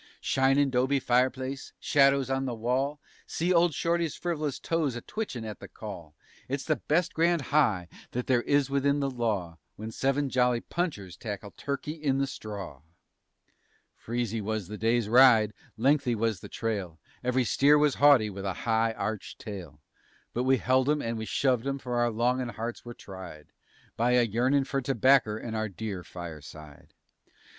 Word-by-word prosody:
_Shinin' 135 Hz, +1 st, +2 dB
'dobe 130 Hz, +2 st, +2 dB
fireplace, 130 Hz, +2 st, 0 dB
shadows 140 Hz, -2 st, +3 dB
on 135 Hz, 0 st, -1 dB
the 125 Hz, -2 st, -3 dB
wall 130 Hz, +6 st, 0 dB
_ -, -, -34 dB, 0.2 s
(See 175 Hz, +3 st, 0 dB
old 170 Hz, -3 st, +3 dB
Shorty's 170 Hz, -1 st, 0 dB
friv'lous 155 Hz, -5 st, -2 dB
toes 160 Hz, -6 st, -1 dB
a 120 Hz, -, -5 dB
twitchin' 135 Hz, -, -5 dB
at 105 Hz, -1 st, -7 dB
the -, -, -9 dB
call:) 85 Hz, -8 st, -9 dB, 0.3 s
It's 135 Hz, +1 st, -3 dB
the 155 Hz, -3 st, 0 dB
best 165 Hz, +7 st, 0 dB
grand 170 Hz, -1 st, +2 dB
high 110 Hz, -, +3 dB, 0.2 s
that 125 Hz, 0 st, -3 dB
there 125 Hz, -2 st, +2 dB
is 140 Hz, +2 st, +2 dB
within 140 Hz, +1 st, +1 dB
the 140 Hz, -1 st, -1 dB
law 100 Hz, -9 st, -2 dB, 0.2 s
When 110 Hz, +2 st, -7 dB
seven 135 Hz, +3 st, 0 dB
jolly 125 Hz, -1 st, +2 dB
punchers 115 Hz, -, -4 dB
tackle 105 Hz, -1 st, -6 dB
"Turkey 140 Hz, +1 st, -4 dB
in 150 Hz, -4 st, -1 dB
the 140 Hz, -, +1 dB
Straw." 100 Hz, -, -7 dB, 1.1 s
Freezy 115 Hz, -1 st, -3 dB
was 105 Hz, -2 st, -3 dB
the 105 Hz, -, -6 dB
day's 115 Hz, 0 st, +1 dB
ride, 115 Hz, -3 st, +6 dB, 0.2 s
lengthy 135 Hz, 0 st, +2 dB
was 110 Hz, -3 st, 0 dB
the -, -, -10 dB
trail, 100 Hz, -8 st, -3 dB, 0.2 s
Ev'ry 125 Hz, +1 st, +2 dB
steer 140 Hz, +5 st, +4 dB
was 150 Hz, -2 st, +3 dB
haughty 135 Hz, -8 st, +6 dB
with 100 Hz, 0 st, -7 dB
a 95 Hz, -1 st, -1 dB
high 115 Hz, 0 st, +2 dB
arched 110 Hz, -1 st, -4 dB
tail, 90 Hz, -9 st, -8 dB, 0.5 s
But 125 Hz, +2 st, -1 dB
we 130 Hz, 0 st, +4 dB
held 130 Hz, +2 st, +2 dB
'em 150 Hz, -1 st, +1 dB
and 115 Hz, 0 st, -2 dB
we 110 Hz, 0 st, -4 dB
shoved 130 Hz, +1 st, +1 dB
'em, 140 Hz, 0 st, -1 dB
for 125 Hz, -2 st, -4 dB
our 120 Hz, 0 st, +3 dB
longin' 120 Hz, +2 st, 0 dB
hearts 115 Hz, +2 st, -5 dB
were 120 Hz, -1 st, -9 dB
tried 95 Hz, -6 st, -10 dB, 0.5 s
By 120 Hz, +2 st, +2 dB
a 125 Hz, -1 st, +5 dB
yearnin' 125 Hz, +5 st, +2 dB
for 135 Hz, 0 st, -2 dB
tobacker 130 Hz, -3 st, +3 dB
and 110 Hz, 0 st, -5 dB
our 110 Hz, 0 st, -1 dB
dear 100 Hz, -2 st, -5 dB
fireside. 75 Hz, -4 st, -10 dB
125 Hz, 170 wpm, -28 LUFS, 110-140 Hz, 1.1 s, ride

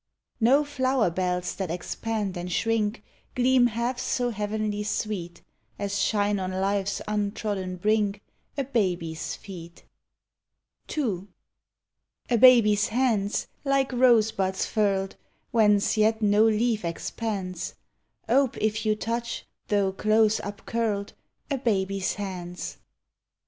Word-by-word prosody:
No 260 Hz, +6 st, +5 dB
Hower 260 Hz, -7 st, +1 dB
lK'lls 180 Hz, 0 st, -1 dB
that 190 Hz, -3 st, -3 dB
expand 200 Hz, +3 st, -3 dB
and 175 Hz, +1 st, -5 dB
shrink 225 Hz, +3 st, 0 dB, 0.3 s
Gleam 250 Hz, 0 st, +4 dB
half 240 Hz, +2 st, -2 dB
so 250 Hz, -1 st, 0 dB
heavenly 210 Hz, 0 st, -2 dB
sweet 210 Hz, -4 st, -3 dB, 0.3 s
As 200 Hz, 0 st, -2 dB
shine 205 Hz, -1 st, +1 dB
on 185 Hz, -1 st, -2 dB
life's 195 Hz, +1 st, -1 dB
untrodden 205 Hz, -3 st, -2 dB
brink 210 Hz, +1 st, +1 dB, 0.4 s
A 275 Hz, -, +1 dB
baby's 180 Hz, -, -1 dB
feet. 170 Hz, -4 st, -11 dB, 1.1 s
ii. 205 Hz, -, -1 dB, 1.0 s
A 240 Hz, -, +4 dB
baby's 215 Hz, -5 st, +6 dB
hands, 220 Hz, -4 st, +1 dB, 0.2 s
like 275 Hz, -1 st, +1 dB
rosebuds 220 Hz, -6 st, +3 dB
furled, 195 Hz, -3 st, 0 dB, 0.3 s
Whence 210 Hz, -3 st, +3 dB
yet 220 Hz, +1 st, +3 dB
no 210 Hz, 0 st, +4 dB
leaf 225 Hz, 0 st, +2 dB
expands, 185 Hz, +1 st, -4 dB, 0.5 s
Ope 265 Hz, +1 st, +2 dB
if 215 Hz, +1 st, -1 dB
you 215 Hz, -, +3 dB
touch, 235 Hz, +2 st, -3 dB, 0.2 s
though 200 Hz, -2 st, +2 dB
close 215 Hz, +2 st, +3 dB
upcurled, 205 Hz, 0 st, -3 dB, 0.4 s
A 275 Hz, -, 0 dB
baby's 195 Hz, -5 st, 0 dB
hands. 180 Hz, -3 st, -6 dB
210 Hz, 110 wpm, -26 LUFS, 195-230 Hz, 1.1 s, baby's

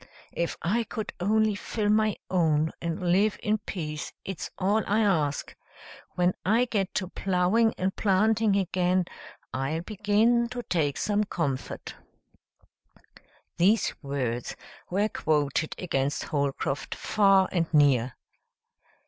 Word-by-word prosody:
"If 170 Hz, 0 st, -2 dB
I 225 Hz, +7 st, +1 dB
could 220 Hz, -1 st, -5 dB
only 215 Hz, +3 st, +2 dB
fill 205 Hz, +1 st, -2 dB
my 215 Hz, 0 st, +3 dB
own 160 Hz, -4 st, +2 dB
and 170 Hz, +1 st, -1 dB
live 200 Hz, +3 st, +3 dB
in 215 Hz, +1 st, +1 dB
peace, 155 Hz, -6 st, -5 dB
it's 190 Hz, -4 st, -5 dB
all 200 Hz, +3 st, +2 dB
I 210 Hz, +2 st, +2 dB
ask. 155 Hz, -9 st, 0 dB, 0.6 s
When 180 Hz, 0 st, +2 dB
I 225 Hz, +6 st, +3 dB
get 200 Hz, -6 st, -2 dB
to 185 Hz, -3 st, -1 dB
plowing 195 Hz, +5 st, +1 dB
and 190 Hz, +1 st, -1 dB
planting 215 Hz, +1 st, +2 dB
again 185 Hz, -1 st, +1 dB, 0.5 s
I'll 135 Hz, +5 st, -2 dB
begin 215 Hz, +4 st, +2 dB
to 245 Hz, 0 st, -5 dB
take 150 Hz, -9 st, 0 dB
some 210 Hz, 0 st, +1 dB
comfort." 145 Hz, -9 st, -3 dB, 1.6 s
These 200 Hz, +6 st, +3 dB
words 130 Hz, -5 st, -3 dB, 0.3 s
were 200 Hz, +4 st, +1 dB
quoted 150 Hz, -3 st, 0 dB
against 145 Hz, -5 st, -1 dB
Holcroft, 140 Hz, -1 st, -2 dB
far 195 Hz, -2 st, +3 dB
and 170 Hz, -3 st, 0 dB
near. 135 Hz, -5 st, +3 dB
185 Hz, 120 wpm, -27 LUFS, 155-210 Hz, 1.6 s, my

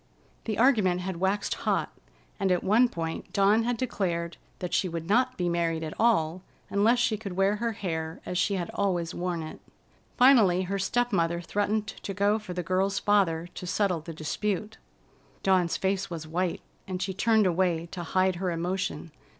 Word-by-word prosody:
The 215 Hz, -2 st, -2 dB
argument 215 Hz, -8 st, +3 dB
had 185 Hz, -1 st, -4 dB
waxed 190 Hz, +3 st, 0 dB
hot, -, -, -1 dB, 0.5 s
and 195 Hz, -2 st, +1 dB
at 180 Hz, -, +1 dB
one 235 Hz, +5 st, +4 dB
point 165 Hz, -4 st, -5 dB
Dawn 200 Hz, +3 st, +4 dB
had 245 Hz, 0 st, 0 dB
declared 175 Hz, -9 st, -2 dB, 0.2 s
that 180 Hz, -, -5 dB
she 185 Hz, -, +1 dB
would 165 Hz, -1 st, -5 dB
not 250 Hz, +5 st, +2 dB
be 180 Hz, -, 0 dB
married 165 Hz, -1 st, 0 dB
at 155 Hz, -, -4 dB
all 185 Hz, -7 st, +2 dB, 0.3 s
unless 215 Hz, +5 st, +3 dB
she 235 Hz, -3 st, +1 dB
could 200 Hz, -3 st, -6 dB
wear 195 Hz, +3 st, +2 dB
her 230 Hz, +1 st, -1 dB
hair 160 Hz, -6 st, -4 dB
as 180 Hz, -, -2 dB
she 200 Hz, +2 st, +1 dB
had 175 Hz, -3 st, -3 dB
always 175 Hz, -4 st, -1 dB
worn 175 Hz, -2 st, -2 dB
it. 155 Hz, -, -8 dB, 0.6 s
Finally 225 Hz, -9 st, +6 dB
her 195 Hz, +2 st, -2 dB
step 245 Hz, +4 st, 0 dB
mother 170 Hz, -1 st, +1 dB
threatened 205 Hz, +4 st, -1 dB
to 200 Hz, -1 st, -7 dB
go 205 Hz, +2 st, +2 dB
for 210 Hz, -4 st, -7 dB
the 180 Hz, -, -2 dB
girl's 190 Hz, +2 st, 0 dB
father 190 Hz, -6 st, +2 dB
to 180 Hz, -, -7 dB
settle 185 Hz, -2 st, +1 dB
the 165 Hz, -, -8 dB
dispute. 205 Hz, +7 st, -3 dB, 0.6 s
Dawn's 185 Hz, -3 st, +2 dB
face 195 Hz, 0 st, -1 dB
was 165 Hz, -2 st, -6 dB
white, 175 Hz, +2 st, -2 dB, 0.3 s
and 185 Hz, -1 st, -3 dB
she 190 Hz, +1 st, -2 dB
turned 220 Hz, +2 st, +3 dB
away 175 Hz, -2 st, +1 dB
to 180 Hz, -, -5 dB
hide 185 Hz, +1 st, +1 dB
her 185 Hz, 0 st, -1 dB
emotion. 170 Hz, -2 st, -3 dB
190 Hz, 180 wpm, -27 LUFS, 170-205 Hz, 0.6 s, Finally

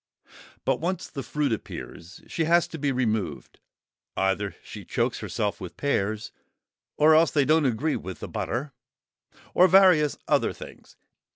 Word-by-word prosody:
But 135 Hz, -1 st, +1 dB
once 180 Hz, +2 st, -2 dB
the 140 Hz, -, -6 dB
fruit 145 Hz, -3 st, -1 dB
appears, 90 Hz, -4 st, -8 dB
she 165 Hz, -, -2 dB
has 170 Hz, +1 st, +3 dB
to 160 Hz, -, -7 dB
be 140 Hz, -1 st, 0 dB
removed; 110 Hz, -6 st, -2 dB, 0.6 s
either 95 Hz, +1 st, 0 dB
she -, -, -9 dB
chokes -, -, -1 dB
herself 105 Hz, -1 st, -3 dB
with 90 Hz, -, -8 dB
pears, 110 Hz, -6 st, -1 dB, 0.7 s
or 155 Hz, +1 st, +6 dB
else 160 Hz, +1 st, +5 dB
they 145 Hz, -3 st, +2 dB
don't 155 Hz, +1 st, +3 dB
agree 140 Hz, +6 st, 0 dB
with 95 Hz, -2 st, -7 dB
the -, -, -6 dB
butter; 135 Hz, +4 st, -3 dB, 0.8 s
or 185 Hz, -, +6 dB
various 180 Hz, -5 st, +5 dB
other -, -, +2 dB
things. -, -, -13 dB
140 Hz, 150 wpm, -26 LUFS, 110-160 Hz, 0.8 s, or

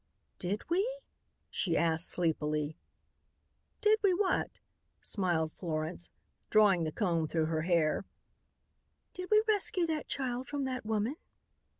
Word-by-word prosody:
"Did 195 Hz, +4 st, -3 dB
we?" 380 Hz, +8 st, +1 dB, 0.6 s
she 170 Hz, -3 st, 0 dB
asked 165 Hz, 0 st, +2 dB
sleepily. 155 Hz, -3 st, 0 dB, 1.1 s
"Did 430 Hz, 0 st, +4 dB
we 390 Hz, -3 st, +3 dB
what?" 375 Hz, -1 st, 0 dB, 0.4 s
smiled 170 Hz, -6 st, 0 dB
Florence, 165 Hz, 0 st, -3 dB, 0.4 s
drawing 200 Hz, -6 st, +4 dB
the 155 Hz, -, -2 dB
comb 170 Hz, -4 st, 0 dB
through 160 Hz, 0 st, 0 dB
her 160 Hz, 0 st, -1 dB
hair. 170 Hz, +1 st, +1 dB, 1.1 s
"Did 365 Hz, 0 st, -7 dB
we 430 Hz, 0 st, +5 dB
rescue 395 Hz, -4 st, +3 dB
that 315 Hz, -2 st, -2 dB
child 255 Hz, -1 st, -2 dB
from 285 Hz, -1 st, -3 dB
that 255 Hz, -4 st, -4 dB
woman?" 220 Hz, +6 st, -1 dB
195 Hz, 120 wpm, -32 LUFS, -, 1.1 s, we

